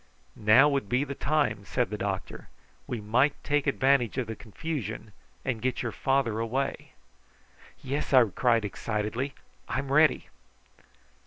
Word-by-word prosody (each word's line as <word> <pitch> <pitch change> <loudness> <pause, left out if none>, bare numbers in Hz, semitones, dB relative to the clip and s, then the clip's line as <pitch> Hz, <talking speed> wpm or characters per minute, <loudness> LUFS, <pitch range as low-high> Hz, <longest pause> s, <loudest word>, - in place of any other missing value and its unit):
"Now 110 +7 +6
would 140 -8 -1
be 125 +4 +2
the 140 -1 -4
time," 140 -8 0
said - - -1
the - - -3
doctor. - - -4 0.4
"We 120 - -3
might 125 +8 +2
take 145 -1 0
advantage 135 -3 +2
of 130 - 0
the 115 0 -6
confusion 115 - -5 0.3
and 120 -4 -2
get 130 0 -1
your 120 - -2
father 135 -3 0
away." 130 +5 -3 0.9
"Yes!" 140 +3 -3
I 130 -3 +7
cried 115 +1 +2
excitedly. 110 +6 -3 0.3
"I'm 135 +1 -2
ready!" 155 +2 +3
130 Hz, 140 wpm, -28 LUFS, 110-140 Hz, 0.9 s, I